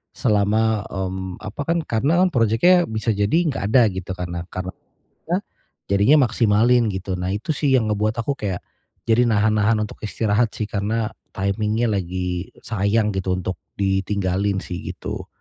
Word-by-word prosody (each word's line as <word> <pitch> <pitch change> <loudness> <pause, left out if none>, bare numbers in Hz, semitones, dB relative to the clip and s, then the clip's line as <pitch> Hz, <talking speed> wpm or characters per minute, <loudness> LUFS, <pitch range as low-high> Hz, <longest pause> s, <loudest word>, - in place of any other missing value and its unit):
Selama, 110 0 +2
mmm, 95 -1 -4
apa 105 - -6
kan 170 +1 +2
karena 145 +10 +2
kan 185 - +3
projeknya 120 - +4
bisa 110 +1 0
jadi 105 +8 +1
enggak 135 -8 -2
ada, 125 - +6
gitu. 95 0 -6
Karena 85 -1 -4
karena 95 0 -4 0.6
ya? 180 - +3 0.5
Jadinya 100 +9 +5
maksimalin 115 +1 +3
gitu. 95 0 -3
Nah, 90 +1 -2
itu 105 - -4
sih 140 -1 0
yang 115 -4 +3
ngebuat 105 +1 0
aku 140 +4 -1
kayak, 95 -4 -3 0.5
jadi 120 +2 +4
nahan-nahan 105 +1 +3
untuk - - -9
istirahat 110 +1 +1
sih 110 - -3
karena 110 +2 -1 0.2
timing-nya 105 +4 0
lagi 90 -1 -3 0.2
sayang 105 0 +1
gitu, 95 -1 -1
untuk 95 +1 -3 0.2
ditinggalin 95 0 0
sih, 90 - -5 0.2
gitu. - - -6
105 Hz, 150 wpm, -22 LUFS, 95-115 Hz, 0.6 s, ada